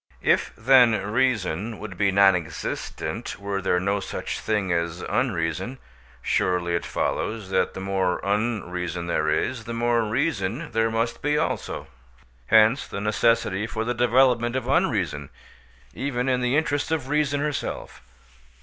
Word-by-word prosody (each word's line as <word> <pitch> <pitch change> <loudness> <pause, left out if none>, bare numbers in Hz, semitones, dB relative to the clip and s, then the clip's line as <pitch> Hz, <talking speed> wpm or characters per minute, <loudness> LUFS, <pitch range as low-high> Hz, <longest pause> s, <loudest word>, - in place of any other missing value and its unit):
If, - - +2
then, 120 -1 +5
reason 110 -4 0
would 105 -2 -8
be 100 +1 +2
non 95 0 +5
existent 85 -3 -5
were 100 -1 -3
there 90 -1 +1
no 100 +2 0
such 95 - -5
thing 105 -4 -1
as 85 +1 -2
unreason, 85 +10 -1 0.5
surely 90 -1 +1
it 85 - -1
follows 110 -4 -2
that 95 -1 +1
the 95 - -5
more 95 -2 0
unreason 90 -5 -2
there 80 -2 0
is, 120 -4 -1
the 115 - -5
more 120 0 +2
reason 115 - -1
there 115 0 +1
must 115 +1 -1
be 150 +1 +1
also? 160 - -2 0.6
Hence 110 +4 +5
the - - -5
necessity 105 -1 +1
for 110 0 -3
the 120 - 0
development 120 0 +3
of 130 -2 -2
unreason, 105 - 0 0.6
even 130 -2 -2
in 125 -1 +1
the 125 +3 +2
interests 145 -2 0
of 160 -5 -1
reason 145 -1 +1
herself. 150 0 -4
110 Hz, 145 wpm, -24 LUFS, 95-125 Hz, 0.6 s, then